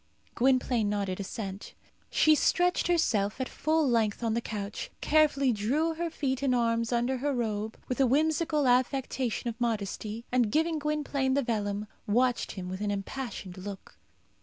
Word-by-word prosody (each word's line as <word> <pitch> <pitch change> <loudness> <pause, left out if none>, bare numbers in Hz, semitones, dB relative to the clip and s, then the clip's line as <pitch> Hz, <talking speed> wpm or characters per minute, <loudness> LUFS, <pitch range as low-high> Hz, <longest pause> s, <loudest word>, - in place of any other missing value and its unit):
Gwynplaine 250 -3 +2
nodded 200 -2 -2
assent. 195 0 -6 0.3
She 310 - +5
stretched 355 +4 +2
herself 235 - +1
at 260 - -1
full 315 0 +1
length 225 -2 +1
on 225 -1 +1
the 235 - 0
couch, 205 -2 -5
carefully 290 -4 +3
drew 280 +11 0
her 335 +1 -2
feet 270 -4 -2
and 265 -3 +2
arms 230 -1 +1
under 240 +2 +1
her 285 +3 -1
robe, 220 -2 -2
with 255 - -3
a 265 - +5
whimsical 305 +2 +2
affectation 255 -1 +1
of 235 +1 -5
modesty, 220 0 -2
and, 245 -4 +2
giving 320 +1 +1
Gwynplaine 290 -3 0
the 280 - +2
vellum, 210 -3 -2 0.2
watched 245 +3 +1
him 185 -2 -6
with 185 +2 -5
an 210 - -1
impassioned 200 -2 -5
look. 195 0 -9
245 Hz, 160 wpm, -29 LUFS, 210-280 Hz, 0.3 s, She